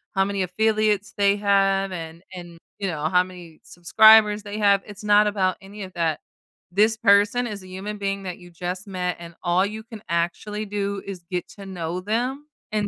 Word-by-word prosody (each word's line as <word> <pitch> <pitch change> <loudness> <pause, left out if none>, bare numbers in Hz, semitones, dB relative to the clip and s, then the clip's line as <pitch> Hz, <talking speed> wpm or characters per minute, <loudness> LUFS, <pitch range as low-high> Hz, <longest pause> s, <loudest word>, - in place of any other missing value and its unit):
how 195 - +4
many 200 -1 -1
affiliates 215 +2 +1
they 200 0 +4
have 195 -1 +2
and 165 0 -7
and, 175 -2 -10 0.2
you 195 - -2
know, 155 -4 -4
how 180 0 +4
many 175 -3 -12
subscribers 210 +4 +5
they 205 0 -6
have, 200 -1 +4
it's 210 0 -11
not 210 0 +5
about 190 -3 0
any 200 +1 -9
of 185 - -9
that. 165 -3 -1 0.5
This 215 +4 +3
person 205 +5 +3
is 205 -3 -7
a 185 - -12
human 195 +3 -6
being 195 -1 -3
that 180 -2 -5
you 175 -1 -14
just 180 +4 -5
met, 180 -2 -3
and 170 -1 -10
all 175 +2 +2
you 215 +2 -6
can 225 -2 -11
actually 175 +6 -2
do 200 -1 -3
is 185 -3 -7
get 180 -1 -3
to 200 - -9
know 180 -2 -4
them 245 +8 -2 0.3
and 210 -1 0
195 Hz, 195 wpm, -23 LUFS, 180-210 Hz, 0.5 s, subscribers